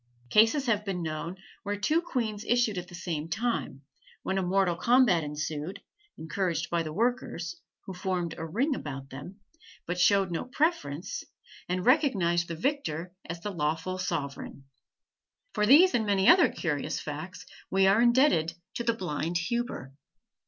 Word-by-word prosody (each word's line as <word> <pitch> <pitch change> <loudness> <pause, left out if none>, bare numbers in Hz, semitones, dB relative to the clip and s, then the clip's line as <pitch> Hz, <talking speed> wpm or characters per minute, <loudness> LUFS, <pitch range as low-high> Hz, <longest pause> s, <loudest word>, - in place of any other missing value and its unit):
Cases 225 +7 +5
have 210 -4 +1
been 190 -4 -3
known 160 +3 -4 0.2
where 205 0 -3
two 305 +11 +2
queens 225 -10 -3
issued 235 -5 +1
at 180 - -8
the 175 - -11
same 165 -3 -4
time, 200 - -2 0.4
when 190 0 0
a - - 0
mortal 185 -1 +2
combat 235 -5 +4
ensued, 150 +3 -4 0.4
encouraged 165 -1 -2
by 170 -1 +2
the 155 -1 -4
workers, 190 -5 -2 0.3
who 190 - -6
formed 180 -2 -2
a - - -4
ring 235 - 0
about 135 - -6
them, 160 +10 -9 0.5
but 175 +1 -3
showed 195 0 +4
no 165 - -2
preference, 250 - -1 0.5
and 180 0 -1
recognized 195 - +3
the 170 - -4
victor 180 - -2
as 170 0 -6
the 205 - -4
lawful 165 +2 -2
sovereign. 140 -6 -4 0.9
For 210 -1 +1
these 330 - +7
and 235 - +2
many 195 -1 +2
other 355 0 +7
curious - - -2
facts - - -7 0.2
we 190 0 +3
are 195 +4 +5
indebted 235 - +4 0.2
to 235 - -2
the 230 -1 +1
blind 170 -3 -2
Huber. 175 - -3
185 Hz, 155 wpm, -28 LUFS, 165-230 Hz, 0.9 s, these